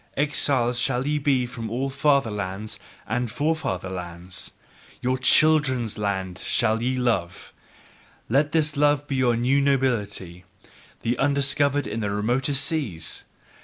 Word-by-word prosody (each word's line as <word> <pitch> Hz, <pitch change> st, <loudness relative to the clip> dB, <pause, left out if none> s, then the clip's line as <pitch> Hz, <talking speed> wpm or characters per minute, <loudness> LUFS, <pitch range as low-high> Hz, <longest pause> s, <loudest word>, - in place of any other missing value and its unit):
Exiles 130 Hz, -4 st, +1 dB
shall 125 Hz, 0 st, 0 dB
ye 150 Hz, +1 st, 0 dB
be 135 Hz, -3 st, +2 dB
from 120 Hz, -2 st, -6 dB
all 130 Hz, +4 st, -2 dB
fatherlands 110 Hz, -8 st, 0 dB, 0.3 s
and 120 Hz, +1 st, -1 dB
forefather 145 Hz, -, -1 dB
lands! 90 Hz, 0 st, -7 dB, 0.5 s
Your 130 Hz, +1 st, 0 dB
CHILDREN'S 130 Hz, -6 st, +3 dB
LAND 95 Hz, -3 st, -2 dB
shall 115 Hz, +2 st, +1 dB
ye 130 Hz, +2 st, 0 dB
love: 115 Hz, -9 st, -1 dB, 0.7 s
let 145 Hz, +5 st, +2 dB
this 155 Hz, -1 st, +1 dB
love 145 Hz, 0 st, +2 dB
be 140 Hz, -2 st, -2 dB
your 125 Hz, -2 st, +3 dB
new 130 Hz, +4 st, +2 dB
nobility, 105 Hz, -10 st, 0 dB, 0.6 s
the 120 Hz, +1 st, -1 dB
undiscovered 140 Hz, 0 st, +2 dB
in 105 Hz, +2 st, -4 dB
the 105 Hz, -2 st, -1 dB
remotest 125 Hz, +7 st, +1 dB
seas! 110 Hz, -, -2 dB
125 Hz, 130 wpm, -24 LUFS, 105-140 Hz, 0.7 s, CHILDREN'S